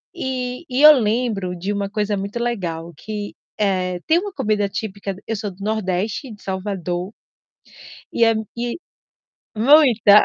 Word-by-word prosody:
E 255 -2 -3
e 255 +2 0
eu 305 0 +11
lembro 215 -5 0
de 190 +4 -3
uma 200 -1 -2
coisa 210 -1 -1
muito 200 +4 -4
legal 175 -9 -3
que 210 +1 -5 0.3
eh, 185 -3 0
tem 325 +2 +5
uma 405 +2 -5
comida 210 - 0
típica 200 0 -4
d 190 - -14
eu 225 - -1
sou 205 0 -3
do 190 +2 -11
nordeste, 215 +3 -2
de 210 - -12
Salvador 190 -1 -3 1.0
e 235 - +4
é 225 - +5
m 220 0 -2
e 240 0 -2 0.8
muita. 235 -4 +6
210 Hz, 160 wpm, -21 LUFS, 195-235 Hz, 1.0 s, eu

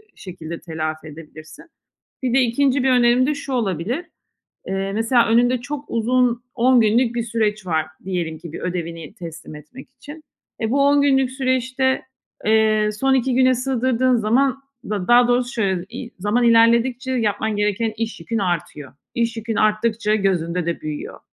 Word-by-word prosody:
şekilde 170 -4 -8
telafi 155 -1 -5
edebilirsin. 155 0 -12 0.6
Bir 250 -2 0
de 270 - +5
2'nci 260 +2 +1
bir 265 - +3
önerim 245 0 +4
de 300 - 0
şu 285 -1 -7
olabilir; 230 - -2 0.6
eee, 195 0 -2
mesela 230 +3 +2
önünde 240 +2 +3
çok 285 +2 -6
uzun, 240 +1 +1
10 250 0 +4
günlük 230 +2 +2
bir 235 - -1
süreç 215 -3 -1
var 160 -2 0 0.2
diyelim 175 -4 -3
ki, 170 -1 -9
bir - - -6
ödevini 170 -2 -5
teslim 170 -5 -9
etmek 150 - -13
için. 295 +4 -12 0.4
Eee, 220 0 -1
bu 280 +1 +3
10 285 0 +4
günlük 270 -2 +2
süreçte, 260 0 0 0.4
eee, 215 -1 +3
son 270 0 +2
2 260 0 +1
güne 255 0 +4
sığdırdığın 255 0 +1
zaman 255 +5 +1 0.3
da, 200 -4 -3
daha 240 0 +6
doğrusu 245 +1 +1
şöyle, 190 -5 -1
iii, 245 0 -8
zaman 210 +6 +1
ilerledikçe 235 +3 +3
yapman 220 -3 -1
gereken 210 +2 0
iş 225 -2 -4
yükün 225 +7 -3
artıyor. 170 -7 -3 0.2
İş 230 -1 -1
yükün 225 0 -3
arttıkça 215 0 +1
gözünde 180 -4 0
de 170 0 -3
büyüyor. 150 -1 -6
230 Hz, 160 wpm, -21 LUFS, 190-255 Hz, 0.6 s, daha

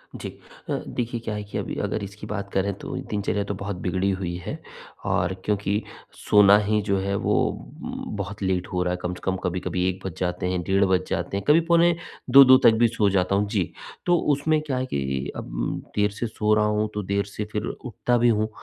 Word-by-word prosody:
जी। - - -6 0.4
अ, - - 0
देखिए 120 0 -3
क्या 110 - -2
है 105 - -4
कि 100 - -6
अभी - - -3
अगर 105 - -2
इसकी 100 +2 -8
बात 100 -1 -4
करें, 100 +1 +1
तो 100 - -7
दिनचर्या 105 0 -1
तो 100 - -4
बहुत 100 +1 -4
बिगड़ी 95 +1 +1
हुई 95 -2 -3
है - - -5 0.5
और 90 +1 +1
क्योंकि 100 0 0 0.5
सोना 105 -1 +7
ही 105 +1 +2
जो 100 - +3
है 100 +1 -1
वो - - +1
उ, - - -6
बहुत 100 +1 -5
लेट 95 -1 0
हो 90 0 +1
रहा 90 0 0
है। - - -2
कम 90 - -2
से 90 - -11
कम 95 - 0
कभी-कभी 90 0 -1
1 95 0 -4
बज 95 -4 -5
जाते 90 0 -1
हैं, 90 -1 -1
डेढ़ 95 +2 +3
बज 95 -1 +1
जाते 100 - -2
हैं, 100 - -4
कभी 150 +3 +7
पौने 170 0 +5 0.4
2-2 130 0 +9
तक 115 - +8
भी 120 - +7
सो 110 -3 +1
जाता 95 0 +1
हूँ। 100 +1 +1
जी, 100 -6 -1 0.3
तो 175 -1 +4 0.2
उसमें 155 +2 +1
क्या 145 -4 -3
है 130 - -1
कि 70 - -2
अब, - - -3
देर 105 0 +3
से 110 +4 -3
सो 105 -1 +1
रहा 105 0 +3
हूँ, 105 0 +1
तो 105 - -3
देर 100 +1 0
से 100 +1 -5
फिर 105 0 -2
उठता 120 0 -1
भी 120 0 +4
हूँ। 110 -1 +1
100 Hz, 225 wpm, -24 LUFS, 95-110 Hz, 0.5 s, 2-2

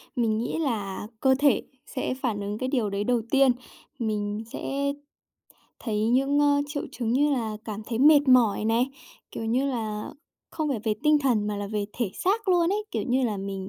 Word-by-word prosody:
Mình 225 -3 +1
nghĩ 240 +7 -2
là 210 -8 -2
cơ 265 +1 +4
thể 285 -2 +3 0.2
sẽ 255 - -3
phản 245 -6 -2
ứng 205 +1 -3
cái 255 - -2
điều 240 -7 0
đấy 200 +1 -2
đầu 245 0 +1
tiên. 275 -2 +5 0.5
Mình 210 -1 -2
sẽ 280 +1 -2 0.9
thấy 215 -2 -1
những, 275 +4 +3
a, 285 0 +4
triệu 290 0 -4
chứng 235 -1 -2
như 290 +3 +3
là 220 -5 -2
cảm 215 -1 -5
thấy 230 -1 -3
mệt 290 0 +6
mỏi 235 -5 +4
này, 230 +3 +2 0.4
kiểu - - -5
như 240 +4 +1
là, 220 -5 -3 0.4
không 310 -2 -2
phải 255 -6 -1
về 215 - +1
tinh 300 -1 +5
thần 240 -7 +1
mà 210 -1 -2
là 205 - -4
về 205 0 -2
thể 230 -6 -2
xác 410 +2 0
luôn 350 -2 +4
ấy, 420 +1 -1
kiểu - - -2
như 255 +1 +2
là 215 -3 -1
mình 195 0 -5
240 Hz, 200 wpm, -26 LUFS, 215-275 Hz, 0.9 s, mệt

